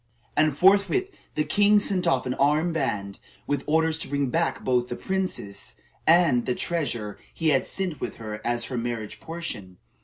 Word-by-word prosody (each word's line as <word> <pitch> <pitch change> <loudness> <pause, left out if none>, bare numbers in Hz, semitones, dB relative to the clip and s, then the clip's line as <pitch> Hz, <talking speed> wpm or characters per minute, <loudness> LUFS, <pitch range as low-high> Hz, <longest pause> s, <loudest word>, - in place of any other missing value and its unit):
And 155 -2 +2
forthwith 200 - +4 0.2
the 150 - +2
king 205 +7 +4
sent 195 -3 +1
off 130 - +2
an 125 - -1
armed 150 +5 +2
band, 100 -10 -2 0.3
with 145 -1 -1
orders 160 +1 +2
to - - -1
bring 140 -3 -1
back 165 +3 0
both 125 -1 +1
the 120 - -4
princess 185 - -3 0.3
and 160 -8 +4
the 125 - +1
treasure 120 -11 -3
he 165 -1 0
had 135 -3 +2
sent 180 -7 -2
with - - -4
her 105 -1 -7
as 120 -1 0
her 125 +1 -4
marriage 115 -3 -4
portion. 135 - -7
145 Hz, 175 wpm, -25 LUFS, 120-170 Hz, 0.3 s, forthwith